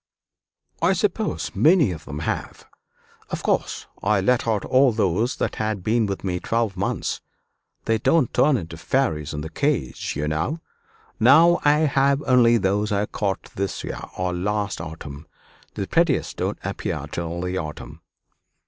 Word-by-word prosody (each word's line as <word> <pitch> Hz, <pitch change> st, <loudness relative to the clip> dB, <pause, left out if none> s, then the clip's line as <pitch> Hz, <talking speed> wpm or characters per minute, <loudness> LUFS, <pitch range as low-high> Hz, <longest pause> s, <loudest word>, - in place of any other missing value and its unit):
"I -, -, +4 dB
suppose -, -, -1 dB
many 150 Hz, -, +4 dB
of 80 Hz, -3 st, -8 dB
them 75 Hz, +1 st, -6 dB
have. -, -, -4 dB, 0.6 s
Of -, -, -4 dB
course -, -, -1 dB, 0.2 s
I 105 Hz, 0 st, +2 dB
let 120 Hz, +5 st, +1 dB
out 110 Hz, -3 st, 0 dB
all 130 Hz, 0 st, +4 dB
those 110 Hz, +2 st, 0 dB
that -, -, -2 dB
had 110 Hz, -3 st, -2 dB
been 110 Hz, +1 st, +2 dB
with 100 Hz, -1 st, -4 dB
me 90 Hz, -2 st, -1 dB
twelve 115 Hz, -2 st, -1 dB
months 100 Hz, +2 st, -2 dB, 0.6 s
they 110 Hz, 0 st, +1 dB
don't 160 Hz, -3 st, +2 dB
turn 130 Hz, -, +3 dB
to 80 Hz, 0 st, -10 dB
fairies 80 Hz, -, 0 dB
in 75 Hz, -, -4 dB
the 80 Hz, -, -6 dB
cage, 135 Hz, -, -1 dB
you 75 Hz, +2 st, -2 dB
know. 80 Hz, -, -1 dB, 0.6 s
Now 165 Hz, +9 st, +6 dB
I 150 Hz, +1 st, +4 dB
have 140 Hz, -1 st, +2 dB
only 120 Hz, -2 st, +5 dB
those 105 Hz, +1 st, 0 dB
I 100 Hz, 0 st, +1 dB
caught 100 Hz, -2 st, -3 dB
this 100 Hz, -1 st, -3 dB
year, -, -, -5 dB, 0.2 s
or 90 Hz, -1 st, -1 dB
last 100 Hz, +1 st, -2 dB
autumn; 80 Hz, -2 st, -8 dB, 0.5 s
the -, -, -2 dB
prettiest -, -, +1 dB
don't -, -, -2 dB
appear -, -, -3 dB
till 85 Hz, 0 st, -4 dB
the 90 Hz, +1 st, -2 dB
autumn." 75 Hz, -6 st, -7 dB
105 Hz, 155 wpm, -23 LUFS, 85-125 Hz, 0.6 s, Now